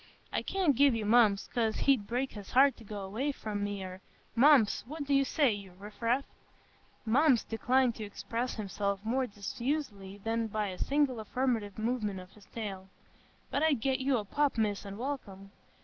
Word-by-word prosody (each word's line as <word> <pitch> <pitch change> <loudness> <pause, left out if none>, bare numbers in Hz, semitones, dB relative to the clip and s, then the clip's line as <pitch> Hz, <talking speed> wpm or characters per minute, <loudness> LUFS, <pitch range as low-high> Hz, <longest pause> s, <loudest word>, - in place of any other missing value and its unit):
"I - - +1
can't 365 -8 +1
give 280 -1 +5
you 220 -2 -2
Mumps, 215 -2 +4
'cause 225 -3 +1
he'd 260 -8 +2
break 255 +3 -1
his 205 -3 -9
heart 270 +2 +6
to - - -13
go 205 -1 -6
away 225 +10 -2
from 210 -6 -4
me—eh, 190 -2 -4 0.4
Mumps, 255 -3 +5
what 305 +2 -5
do 285 0 -1
you 275 0 +5
say, 275 -1 +2
you 200 -3 -6
riff 205 +3 -12
raff?" 245 +4 +1 0.8
(Mumps 255 +2 +4
declined 250 +2 +2
to 220 - -5
express 230 +4 -4
himself 200 -1 -3
more 255 +3 +1
diffusely 205 -1 -4
than 225 +2 -1
by 215 -1 -2
a 185 - -7
single 280 -4 +1
affirmative 220 -2 -1
movement 215 -3 -1
of 185 0 -12
his 210 -2 -18
tail.) 195 -4 -6 0.6
"But 280 - 0
I'd 310 -5 +3
get 265 +1 +1
you 265 -1 +2
a 210 - -3
pup, 290 +4 0
Miss, 205 -2 0
an' 200 0 -7
welcome." 205 -7 -5
225 Hz, 180 wpm, -31 LUFS, 205-265 Hz, 0.8 s, heart